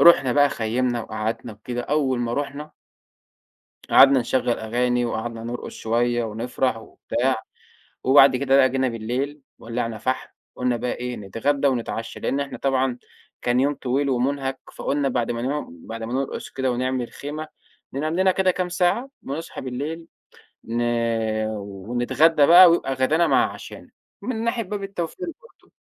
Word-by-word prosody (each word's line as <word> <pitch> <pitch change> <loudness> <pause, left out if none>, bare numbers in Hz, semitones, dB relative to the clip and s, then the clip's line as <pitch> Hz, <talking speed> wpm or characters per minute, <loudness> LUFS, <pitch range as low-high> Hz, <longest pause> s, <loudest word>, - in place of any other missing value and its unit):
رُحنا 140 -7 +7
بقى 145 +2 +5
خيّمنا 120 -1 -1
وقعدنا 110 +1 -4
وكده 120 +4 -5
أول 140 -3 +1
ما 120 0 -1
رُحنا 145 +1 -4 1.2
قعدنا 135 -1 +7
نشغّل 120 0 0
أغاني 120 +2 0
وقعدنا 115 0 -4
نرقُص 120 +1 -5
شوية 120 +1 0
ونفرح 115 +3 -1
وبتاع، 110 - -2 0.7
وبعد 135 0 +7
كده 135 +1 +3
بقى 135 -1 +6
جينا 130 0 +1
بالليل 125 +6 -3 0.2
ولّعنا 115 -1 -3
فحم، 130 +3 -2 0.3
قُلنا 125 -1 0
بقى 120 +1 -2
إيه 125 0 -4
نتغدّى 135 +8 0
ونتعشّى، 115 -3 -3
لإن 140 - -1
إحنا 140 - -5
طبعًا 130 -2 0 0.4
كان 120 +1 +2
يوم 145 +2 +2
طويل 140 +2 -1
ومُنهَك، 135 +1 -1 0.2
فقُلنا 140 -1 0
بعد 125 -2 -1
ما 115 0 -2
ن 145 +4 -2 0.2
بعد 115 0 -6
ما 115 - -4
نرقُص 135 +1 -3
كده 130 -1 -1
ونعمل 125 0 -1
خيمة، 155 +2 -6 0.4
ننام 155 +4 -2
لنا 190 +1 +4
كده 190 0 +2
كام 180 0 -1
ساعة 180 +9 +1
ونصحى 150 +5 -6
بالليل 145 +6 -5 0.6
ن 115 +1 -2 0.7
ونتغدّى 120 - +2
بقى 175 +1 +9
ويبقى 165 -5 +1
غدانا 150 +6 +2
مع - - +3
عشانا، - - -11 0.3
من 230 -3 -3
ناحية 235 0 0
باب 205 0 -5
التوفير 195 - -4 0.2
برضه. 475 - -22
130 Hz, 150 wpm, -23 LUFS, 120-145 Hz, 1.2 s, بقى